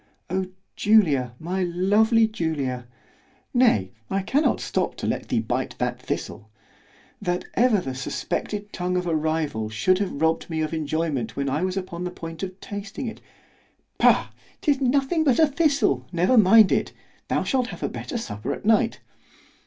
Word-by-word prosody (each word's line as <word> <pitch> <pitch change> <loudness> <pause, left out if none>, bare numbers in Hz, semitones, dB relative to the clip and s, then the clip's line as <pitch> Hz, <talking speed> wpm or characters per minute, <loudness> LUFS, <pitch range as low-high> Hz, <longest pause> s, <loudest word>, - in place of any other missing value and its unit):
O 190 0 0 0.3
Julia, 150 - +3
my 180 +4 -2
lovely 205 +6 +3
Julia!—nay 140 - -2 0.2
I 195 - 0
cannot 275 +6 +2
stop - - -1
to - - -5
let - - -2
thee - - +2
bite - - -3
that - - -2
thistle——that 110 - -6
ever 235 -3 +4
the 135 -7 -4
suspected 205 +9 -4
tongue 180 0 -1
of 180 - -1
a 170 -2 0
rival 155 -8 -1
should 110 - +2
have 190 -8 -2
robbed 160 +2 +1
me 160 -1 -2
of 155 +1 -2
enjoyment 155 -6 -2
when 140 -1 -1
I 150 +4 0
was 185 +1 -1
upon 180 -2 -4
the 180 - -2
point 165 -2 -8
of 190 0 -5
tasting 205 +7 -6
it.—— 225 - -6 0.8
——Pugh!—'tis 280 -2 +1
nothing 275 +5 +2
but 270 -6 +3
a 320 - +6
thistle—never 255 - +1
mind 215 -1 +7
it—thou - - -2
shalt 255 -2 0
have - - -8
a - - +1
better - - -5
supper 105 - -4
at - - -12
night. 225 +2 +2
180 Hz, 155 wpm, -24 LUFS, 155-220 Hz, 0.8 s, mind